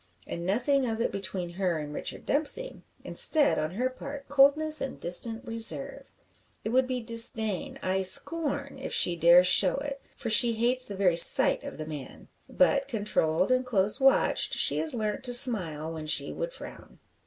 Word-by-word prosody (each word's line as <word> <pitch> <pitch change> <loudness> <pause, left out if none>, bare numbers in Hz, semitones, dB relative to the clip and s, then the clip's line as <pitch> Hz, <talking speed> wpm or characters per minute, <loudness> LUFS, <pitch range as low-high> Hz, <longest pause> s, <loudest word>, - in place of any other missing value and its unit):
And 170 +1 -7
nothing 255 +6 -1
of 225 -1 -4
it 230 - -2
between 185 -3 -6
her 180 -2 -3
and 150 -1 -8
Richard - - -7
Dempsey. 315 - -1 0.2
Instead, 305 -3 +1
on 155 - -3
her 250 +4 -1
part, 275 +2 -10
coldness 285 +3 +2
and 270 - -6
distant 225 +8 +3
reserve. 230 -2 0 0.6
It - - -5
would 255 +2 0
be 255 -1 -4
disdain 230 +2 -2
ay, 190 +1 -2
scorn 280 - 0
if - - -7
she 175 - +2
dare 170 +2 +5
show 185 0 +4
it; 280 0 -7
for 230 - -6
she 230 +2 +5
hates 245 +3 -1
the 200 - -8
very 185 -3 0
sight 170 - +5
of - - -9
the 155 - -7
man. 150 -4 -11 0.2
But, 275 0 0
controlled 205 - -2
and 255 0 +1
close 210 -2 -1
watched, 270 0 +1
she - - +1
has 310 -5 +3
learnt 215 -2 -4
to 245 - 0
smile 165 - +3
when 155 -1 -8
she 140 -2 -1
would - - -6
frown. - - -13
230 Hz, 175 wpm, -26 LUFS, 185-270 Hz, 0.6 s, dare